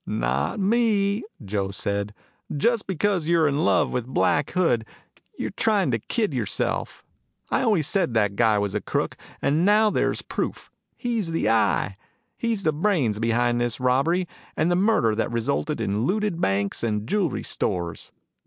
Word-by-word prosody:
"Not 65 - -1
me," 205 -1 +2 0.2
Joe 100 -1 -2
said. 100 +1 -3 0.4
"Just 235 +7 +1
because 190 -2 0
you're 165 -2 +4
in 145 +1 0
love 95 -2 +3
with 125 -1 -2
Black 145 +2 +1
Hood 165 -11 +1 0.5
you're - - -3
trying 205 - +1
to 115 - 0
kid 210 - -1
yourself. 120 -6 -2 0.5
I - - +2
always 210 - +2
said 175 - 0
that 105 -2 +2
guy 110 -1 +3
was 100 -1 -1
a 105 - -1
crook. - - -2 0.3
And 150 +4 +2
now 210 +2 +4
there's - - 0
proof. - - -4 0.3
He's 230 -8 -2
the 165 - 0
Eye. 110 -3 +1 0.4
He's 230 -4 -1
the 155 - +2
brains 150 - +1
behind 120 +1 +1
all - - +2
this 120 - -5
robbery 140 +8 +2 0.3
and 160 +3 +2
murder 185 - +3
that 110 +2 -1
resulted 110 -11 -1
in 105 +4 -1
looted 205 -1 0
banks 100 +1 0
and 105 -2 -1
jewelry 190 -6 0
stores. 85 -2 -3
140 Hz, 160 wpm, -24 LUFS, -, 0.5 s, you're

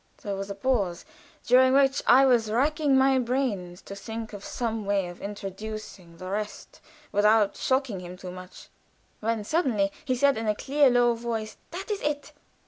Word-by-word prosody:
There 200 -2 -3
was 195 +1 -5
a 200 - -4
pause, 200 -5 -1 0.4
during 260 +1 +5
which 275 0 +4
I 265 +2 +7
was 240 -4 +3
racking 280 +4 +2
my 265 0 +4
brains 230 -9 -2
to 200 - -8
think 220 +2 -7
of 200 -1 -8
some 225 -3 -3
way 200 -1 0
of 175 0 -10
introducing 200 -3 -7
the 185 - -8
rest 210 +2 -5 0.3
without 210 0 +3
shocking 260 -7 0
him 180 0 -9
too 180 -1 -8
much, 185 0 -11 0.5
when 225 0 -1
suddenly 220 - +1
he 260 -4 0
said, 275 -1 +3
in 225 - -3
a 210 - +2
clear, 280 +4 +3
low 245 -1 +4
voice: 230 -2 -4
"That 380 +5 -6
is 410 - -2
it. 290 -1 -2
225 Hz, 175 wpm, -26 LUFS, 200-265 Hz, 0.5 s, I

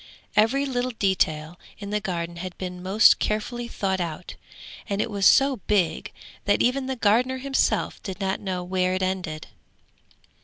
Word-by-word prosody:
Every 260 +6 +3
little 255 -2 -1
detail 165 -4 0 0.2
in 200 0 -7
the 210 - +1
garden 170 -3 -4
had 180 +1 -7
been 180 -1 -6
most 195 +4 +5
carefully 235 +3 -2
thought 190 -5 -2
out, 170 +1 -5 0.6
and 200 0 -1
it 220 - -1
was 200 -1 +3
so 275 -1 +5
big, 195 -6 +1 0.3
that - - +3
even 260 +2 +1
the 265 - -2
gardener 245 +4 +2
himself 270 +1 0
did 190 -2 -6
not 190 -1 -1
know 185 -2 -3
where 185 0 0
it 185 - -1
ended. 185 -5 -3
195 Hz, 160 wpm, -25 LUFS, 180-235 Hz, 0.6 s, most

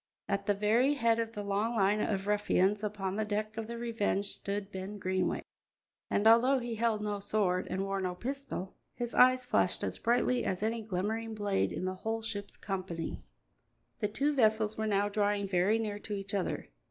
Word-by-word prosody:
At 200 0 -1
the 205 - +3
very 230 +8 +3
head 230 -4 +2
of 230 0 -2
the 205 - -4
long 205 +4 0
line 205 0 +3
of 195 -2 -1
ruffians 205 0 +2
upon 200 -2 -2
the 215 - +1
deck 215 +1 -2
of 225 -1 -4
the 235 0 -5
Revenge 225 -4 0
stood 200 0 -2
Ben 190 +2 -5
Greenway; 185 -1 -1 0.7
and, 205 - +1
although 235 +5 +6
he 240 -2 -3
held 225 -1 0
no 205 -1 -2
sword 195 -3 0
and 190 +1 -1
wore 195 0 -2
no 180 -1 -2
pistol, 255 -4 -5 0.2
his 240 -1 -4
eyes 255 0 +5
flashed - - +1
as - - -1
brightly 245 +1 +2
as 185 +2 -1
any 225 +1 0
glimmering 220 +3 -2
blade 205 -2 0
in - - -3
the 185 - -1
whole 225 0 -2
ship's 205 -3 -5
company. 185 -4 -4 0.8
The 210 - +1
two 280 +8 0
vessels 220 -4 +3
were 220 0 -2
now 205 -1 +2
drawing 205 -1 0
very 190 +3 +3
near 210 -2 -3
to 210 - -6
each 200 0 -6
other. 195 -3 -2
210 Hz, 190 wpm, -31 LUFS, 195-225 Hz, 0.8 s, although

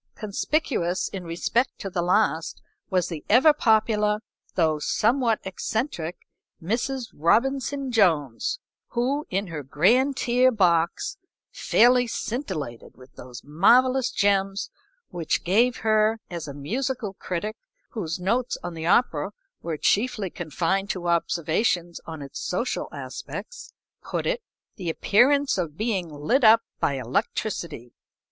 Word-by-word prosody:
Conspicuous 210 - -1
in 190 -3 -7
respect 175 +9 0
to - - -6
the 180 -2 -2
last 180 -2 +1 0.3
was 185 -2 +1
the 165 -4 -6
ever 260 +8 +6
popular, 215 -4 +2 0.3
though 160 -4 +2
somewhat 230 - +1
eccentric 190 - -3 0.4
Mrs. 240 +7 -2
Robinson 270 - +1
Jones, 175 - +2 0.4
who 265 +5 0
in 195 +2 -1
her 165 -5 -6
grand 235 - +2
tier 250 +2 +3
box 180 - +1 0.3
fairly 245 +1 +4
scintillated 185 - -5
with 130 0 -16
those 125 -1 -10
marvellous 245 - +4
gems 195 -1 0 0.4
which 165 -3 -2
gave 230 +8 +3
her, 215 +1 +3
as 170 -3 -5
a 140 - -6
musical 225 - -3
critic, 195 +3 -4 0.4
whose 175 -7 -4
notes 235 +7 0
on 175 - -5
the 160 0 -4
opera 180 -6 +2 0.3
were 165 -2 -3
chiefly 210 - +1
confined 175 +4 -1
to 180 -3 -3
observations 170 +1 0
on 160 -3 -6
its 140 - -8
social 210 +8 -2
aspects, - - -8 0.3
put - - -3
it, - - 0 0.4
"the 180 -5 -3
appearance 265 - +3
of 160 -4 -3
being 205 -6 -1
lit 155 - 0
up 225 +1 +7 0.2
by - - +1
electricity." 135 - -3
200 Hz, 125 wpm, -25 LUFS, 170-240 Hz, 0.4 s, up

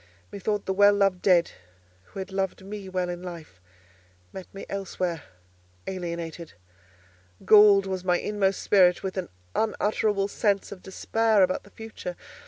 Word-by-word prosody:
Methought 205 +1 -2
the 190 - -1
well 205 +1 +5
loved 195 -3 +2
dead, 175 -3 +3 0.5
who - - -15
had 190 0 -6
loved 190 -1 -3
me 200 -1 -7
well 185 -1 -1
in 175 0 -5
life, 165 - -10 0.7
met 190 - -9
me 195 - -9
elsewhere, 185 -4 -3 0.6
alienated: 170 -3 -5 0.9
galled 205 -2 +7
was 190 -1 -4
my 180 -1 +2
inmost 195 -1 -1
spirit 180 -3 +4
with 190 -1 -4
an 185 -2 -4 0.2
unutterable 210 -2 0
sense 200 -1 0
of 195 -2 -9
despair 220 +2 +1
about 185 0 0
the - - -16
future. 215 -5 -8
190 Hz, 145 wpm, -26 LUFS, 180-205 Hz, 0.9 s, galled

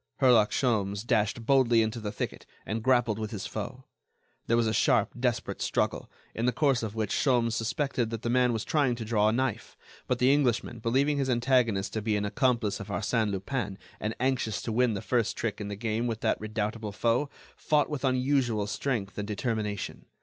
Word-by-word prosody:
Herlock 120 -6 +5
Sholmes 105 -4 0
dashed 115 -1 0
boldly 120 -3 +4
into 110 +2 -3
the 105 -2 -4
thicket, - - -5 0.2
and 110 +2 -3
grappled 120 -3 +2
with 110 -1 -3
his 105 -3 -5
foe. - - -6 0.6
There 115 - +3
was 120 - +3
a 110 - 0
sharp, 125 -6 +3
desperate 120 -2 -1
struggle, - - -1 0.2
in 115 +2 -1
the - - +4
course 135 0 +2
of 110 -2 -4
which 110 -1 -1
Sholmes 120 -5 +2
suspected 120 +1 -1
that 115 0 -5
the 120 - -1
man 125 0 +3
was 115 -3 -2
trying 140 -6 +2
to 115 -1 -6
draw 105 -1 +2
a - - +2
knife. 130 -1 -2 0.3
But 125 - +1
the 125 +2 +4
Englishman, 120 -4 0
believing 135 +6 +1
his 135 -1 0
antagonist 120 -5 +2
to 110 - -2
be 105 0 0
an 105 0 0
accomplice 115 -1 +1
of 100 - -7
Arsène 110 +2 0
Lupin 100 +1 -3 0.2
and 110 +1 -3
anxious 130 -4 0
to 115 - -3
win 120 0 +2
the 95 - -5
first 120 -4 0
trick 110 -2 -3
in 100 - -4
the 100 - -4
game 115 +2 -1
with 115 -1 -3
that - - 0
redoubtable 110 0 -3
foe, 120 +7 +1 0.3
fought 150 -1 +2
with 150 -3 -5
unusual 130 -4 +1
strength 105 -2 -3
and 105 - -3
determination. 105 -2 -3
115 Hz, 200 wpm, -28 LUFS, 105-125 Hz, 0.6 s, Herlock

